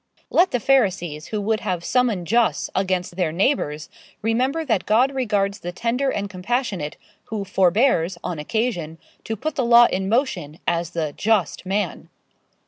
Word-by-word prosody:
Let 365 +2 +4
the 245 - -1
Pharisees 190 - +1
who 215 - -3
would 215 +1 0
have 180 -6 -3
summum 235 -8 +1
jus 230 +5 +1
against 185 -2 -1
their 175 -4 +1
neighbours, 160 - 0 0.4
remember 260 +8 0
that 220 -9 0
God 245 +6 +3
regards 210 -6 0
the 175 - -5
tender 235 +8 -1
and 205 -5 -2
compassionate, 190 - -3 0.3
who 210 -3 -4
forbears, 190 -1 +2
on 170 -4 -3
occasion, 175 -3 -2 0.3
to 225 - -2
put 310 +9 -3
the 265 - -1
law 235 0 +7
in 190 -3 -1
motion, 205 - -1
as 170 -1 0
the 160 -4 -3
just 205 -5 0
man. 195 -2 -2
200 Hz, 155 wpm, -22 LUFS, 175-240 Hz, 0.4 s, law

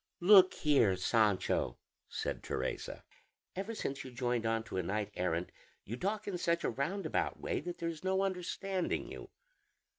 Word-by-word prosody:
"Look 185 0 +8
here, 135 -11 +4
Sancho," 95 - +2 0.3
said - - -3
Teresa; - - -3 0.5
"ever 200 +5 -3
since 140 -8 -3
you 130 - -8
joined 120 -2 -1
on 115 0 +1
to 110 - -6
a - - +2
knight 105 +3 -2
errant 90 -1 -1 0.3
you 110 - -4
talk 205 - -2
in 185 -3 -2
such 170 -1 +1
a - - +1
roundabout 155 - -1
way - - -1
that 175 +2 -5
there 170 - -2
is 165 0 -7
no 190 +1 +2
understanding 190 0 -2
you." - - -8
150 Hz, 160 wpm, -34 LUFS, 110-185 Hz, 0.5 s, Look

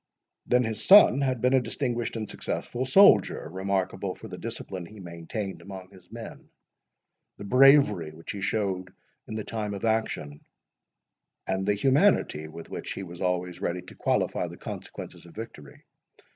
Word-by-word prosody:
Then 125 0 +4
his 110 -2 -3
son 190 -9 +8
had 130 -4 0
been 125 +1 +3
a 130 - +5
distinguished 120 -1 -2
and 110 -2 -3
successful 125 +5 -4
soldier, 195 - +5
remarkable 95 +1 -2
for - - -10
the - - -8
discipline 90 -3 -6
he 105 +2 -13
maintained 90 +3 -6
among 95 -1 -10
his 90 -2 -18
men, - - -9 0.9
the - - -8
bravery 125 - +5
which 80 +2 -8
he 100 - -6
showed 95 -2 -1 0.4
in 110 - -6
the 110 - -3
time 105 -2 -4
of 100 - -4
action, 110 -10 -1 1.0
and 95 +1 -1
the 105 - +3
humanity 135 - +2
with 80 +1 -10
which - - -5
he 95 - -6
was 85 -1 -10
always 90 -1 -1
ready 90 -2 -2
to 90 - -13
qualify - - 0
the - - -10
consequences - - -8
of 85 - -16
victory. 105 -11 -10
100 Hz, 160 wpm, -27 LUFS, 90-120 Hz, 1.0 s, son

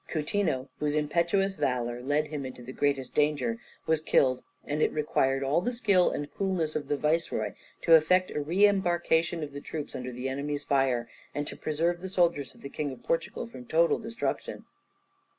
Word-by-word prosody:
Coutinho, 155 -4 0
whose 150 0 0
impetuous 170 +6 +1
valour 120 -6 -1
led 145 +4 +1
him 150 -2 -4
into 130 -1 -8
the 130 +2 -8
greatest 140 -3 0
danger, 150 +11 +1 0.3
was 160 -1 +2
killed, 130 -4 +3 0.2
and 150 +1 -2
it - - +3
required 135 -3 +1
all 140 +5 +2
the 245 - -1
skill 200 -7 +3
and 145 0 -4
coolness 185 -6 -1
of 150 - -2
the 145 - 0
viceroy 160 +3 0 0.3
to 165 - +5
effect 180 +4 +5
a 150 - -2
re 175 +8 +4
embarkation 175 -4 +2
of 145 - -5
the 140 - -6
troops 150 -1 -6
under 125 0 -4
the 125 +2 -4
enemy's 145 +2 -3
fire, 130 -4 +1 0.3
and 145 - -1
to - - -7
preserve 170 +3 -1
the 190 - -5
soldiers 170 -8 +1
of - - -18
the - - -6
King 145 +1 -3
of 130 - -9
Portugal - - -1
from 125 - -11
total 165 +1 +3
destruction. 230 +1 -4
150 Hz, 185 wpm, -29 LUFS, 140-175 Hz, 0.3 s, to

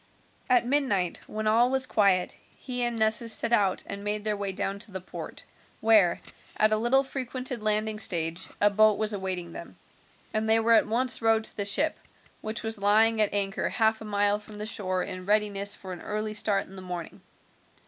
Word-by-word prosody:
At 245 -2 +4
midnight, 245 -10 0
when 215 0 -5
all 230 +3 +4
was 265 0 +3
quiet, 195 -6 +2 0.2
he 250 -2 -4
and 240 -1 -1
Nessus 220 +1 +3
set 230 - +3
out 200 -5 +2
and 200 0 -5
made 210 0 -2
their 210 -1 -1
way 200 -1 -3
down 195 +1 -3
to 210 - -8
the 190 - -4
port, 185 - -9 0.4
where, 215 -6 +4 0.4
at 215 0 +3
a 215 - +3
little 240 +5 +3
frequented 255 -2 -4
landing 215 0 +1
stage, 170 -2 -2
a 205 0 +4
boat 215 0 +4
was 215 0 -1
awaiting 185 -3 -3
them, 170 - -10 0.6
and 220 0 -1
they 225 0 +5
were 230 +1 +3
at 220 - +4
once 240 +3 0
rowed 225 -1 +3
to - - -8
the 200 - -3
ship, 300 +10 0 0.4
which 220 +2 -4
was 220 -1 -4
lying 215 +2 +4
at 210 - +2
anchor 200 -1 -1
half 220 -1 +1
a - - -7
mile 205 0 +1
from 210 0 -13
the 210 - -5
shore 185 -4 -2
in 185 0 -7
readiness 205 -1 +1
for 185 -1 -8
an 175 - -9
early 215 0 -3
start 205 -2 0
in 195 - -14
the 190 - -8
morning. 180 -2 -7
215 Hz, 200 wpm, -27 LUFS, 200-225 Hz, 0.6 s, they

